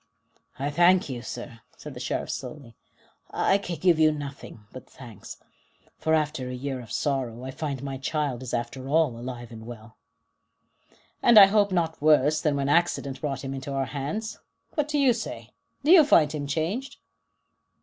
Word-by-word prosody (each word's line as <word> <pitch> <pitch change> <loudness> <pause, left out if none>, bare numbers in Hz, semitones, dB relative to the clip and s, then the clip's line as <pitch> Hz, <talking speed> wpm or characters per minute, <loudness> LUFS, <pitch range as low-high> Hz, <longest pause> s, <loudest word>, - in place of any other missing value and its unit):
"I 140 +2 -2
thank 175 +1 +4
you, 125 -2 -5
sir," 120 -1 -8 0.2
said 150 - -9
the 125 - -9
Sheriff 125 - -3
slowly. 125 -2 -8 0.5
"I 195 - +2
can 180 -3 -5
give 170 0 +3
you 155 0 +5
nothing 140 -6 -8
but 130 - -11
thanks, 120 -6 -11 0.6
for 160 0 +2
after 150 -4 -1
a 125 - -5
year 130 0 -4
of 115 - -13
sorrow 130 -5 -2
I 130 - -5
find 140 -1 -4
my 135 -1 -5
child 140 -3 -2
is 130 - -6
after 120 +3 -4
all 160 0 +3
alive 120 0 -7
and 110 -1 -10
well." 115 -1 -11 1.2
"And 235 -2 +6
I 200 - +12
hope 205 0 +2
not 165 -4 -1
worse 150 0 +4
than 150 -2 +1
when 140 -1 -1
accident 145 -4 +1
brought 140 -2 -3
him 135 0 -4
into 135 +1 -6
our 135 -1 0
hands. 205 +11 -4 0.3
What 300 -2 0
do 300 -1 -1
you 270 -4 +4
say? 230 - -7 0.3
Do 300 - +3
you 355 -4 +9
find 160 - +4
him 145 -2 -4
changed?" 170 - -3
145 Hz, 180 wpm, -26 LUFS, 130-165 Hz, 1.2 s, I